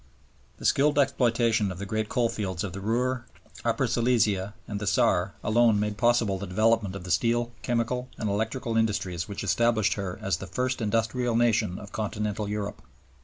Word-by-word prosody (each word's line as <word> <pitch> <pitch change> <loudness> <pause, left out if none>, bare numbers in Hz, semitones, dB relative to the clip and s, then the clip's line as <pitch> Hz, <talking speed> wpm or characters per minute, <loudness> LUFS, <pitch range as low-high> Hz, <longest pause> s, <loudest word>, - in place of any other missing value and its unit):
The - - -9
skilled 145 +2 +3
exploitation 115 -6 +2
of 90 - -7
the 100 - -5
great 110 +2 -2
coalfields 105 -7 -1
of 95 -4 -4
the 100 - -6
Ruhr, 120 +4 0 0.4
Upper - - +1
Silesia, 110 -5 +1
and 105 -2 -4
the 105 - -4
Saar, - - +2
alone 115 -1 +4
made 105 0 -1
possible 120 -5 +2
the 100 - -5
development 110 +1 +2
of 100 - -6
the 95 - -5
steel, 120 +6 +1
chemical, 125 +1 -1
and 110 - -2
electrical 110 +3 -2
industries 100 -6 0
which 100 - -5
established 110 -3 +2
her 100 -3 -4
as 95 -4 -1
the 95 - -8
first 125 +7 -2
industrial 115 +2 0
nation 115 -5 +2
of 100 - -10
continental 105 -1 -3
Europe. 105 -1 -4
110 Hz, 170 wpm, -27 LUFS, 100-120 Hz, 0.4 s, alone